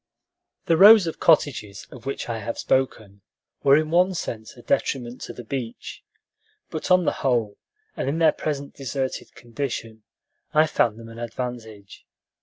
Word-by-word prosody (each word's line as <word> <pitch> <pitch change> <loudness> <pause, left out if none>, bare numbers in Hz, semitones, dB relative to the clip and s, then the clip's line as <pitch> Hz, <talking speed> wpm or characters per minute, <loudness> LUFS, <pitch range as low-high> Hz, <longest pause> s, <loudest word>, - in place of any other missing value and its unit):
The 165 -2 +3
rows 205 +1 +9
of 165 - -5
cottages 115 - +1
of 125 +1 -11
which 135 - -4
I 115 -1 -3
have 115 +2 -5
spoken 110 -7 -1 0.4
were 140 0 +6
in 155 0 -1
one 180 +2 +3
sense 110 -9 -6
a - - -14
detriment 120 -1 -1
to - - -7
the 120 - -9
beach; 120 -1 -6 0.7
but 155 - -4
on 180 -1 +4
the - - +3
whole, 120 -6 0 0.4
and - - -2
in 150 - -1
their 160 -2 +5
present 140 -2 -4
deserted 135 -1 -4
condition, 115 -3 -5 0.5
I 155 +1 +6
found 115 -8 +1
them 115 0 -11
an 115 0 -11
advantage. 115 -4 -7
130 Hz, 160 wpm, -24 LUFS, 115-155 Hz, 0.7 s, rows